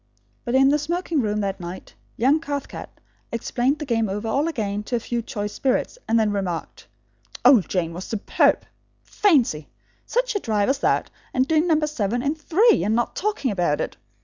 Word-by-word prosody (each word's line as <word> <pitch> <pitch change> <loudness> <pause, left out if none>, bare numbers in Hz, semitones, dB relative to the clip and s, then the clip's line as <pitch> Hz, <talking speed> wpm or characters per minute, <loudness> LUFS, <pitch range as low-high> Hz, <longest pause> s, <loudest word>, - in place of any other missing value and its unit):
But, 240 - -1
in 270 +1 +6
the 295 +1 +3
smoking 335 0 -1
room 210 -2 -1
that 195 -1 -2
night, 175 +1 -8 0.2
young 270 +7 +3
Cathcart 285 -3 -5 0.4
explained 245 +4 0
the 300 - -5
game 225 -5 0
all 195 - -2
over 280 +8 +1
again 210 -8 -2
to 245 - -2
a - - +1
few 235 +1 -3
choice 205 -2 -5
spirits, 270 - -1
and 225 +1 +3
then 215 -2 +2
remarked: 190 -5 -4 0.6
"Old 245 - +6
Jane 170 -3 -1
was 180 +3 -6
superb! 220 -3 +1 0.4
Fancy! 250 - +2 0.4
Such - - 0
a 410 - 0
drive 215 - 0
as 275 0 +1
that, - - +1 0.2
and 255 +1 +2
doing 320 +2 +2
number 310 -2 +3
seven 245 -5 -2
in 285 +1 +1
three 365 +9 +3
and 215 +2 +1
not 240 0 -1
talking 405 - -1
about 175 -7 0
it! - - -3
245 Hz, 185 wpm, -23 LUFS, 205-300 Hz, 0.6 s, in